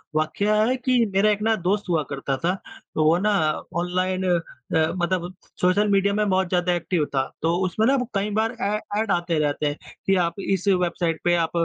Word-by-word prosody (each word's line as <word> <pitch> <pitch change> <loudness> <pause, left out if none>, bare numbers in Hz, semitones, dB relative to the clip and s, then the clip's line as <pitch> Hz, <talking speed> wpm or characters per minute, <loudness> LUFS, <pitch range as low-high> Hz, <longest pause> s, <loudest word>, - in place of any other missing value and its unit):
वाकया 200 +7 +1
है 250 +4 +2
कि 250 -1 +2
मेरा 195 +2 +4
एक 205 - -1
ना 220 +1 +2
दोस्त 200 +2 0
हुआ 165 -3 +2
करता 135 -1 -2
था 175 +6 0 0.4
तो 155 - +2
वो 160 +2 +4
ना 210 +3 +1 0.5
ऑनलाइन 185 +1 -1
अ, 175 -2 +3 0.6
मतलब 180 0 -1 0.3
सोशल 190 +4 +3
मीडिया 200 0 +3
में 210 0 +1
बहुत 190 -1 +2
ज़्यादा 180 -1 +1
एक्टिव 175 -2 0
था। 135 - +3 0.2
तो 165 +2 +1
उसमें 215 +5 0
ना 275 - +4 0.2
कई 200 +1 0
बार 225 +2 0
ऐ 205 +1 +1 0.2
ऐड 220 - 0
आते 175 -2 0
रहते 150 0 0
हैं 145 +1 -2 0.3
कि 195 - +3
आप 170 +3 -5
इस 195 -1 -1
वेबसाइट 175 -3 +1
पे 175 0 +3
आप 165 -2 0
185 Hz, 200 wpm, -23 LUFS, 170-205 Hz, 0.6 s, मेरा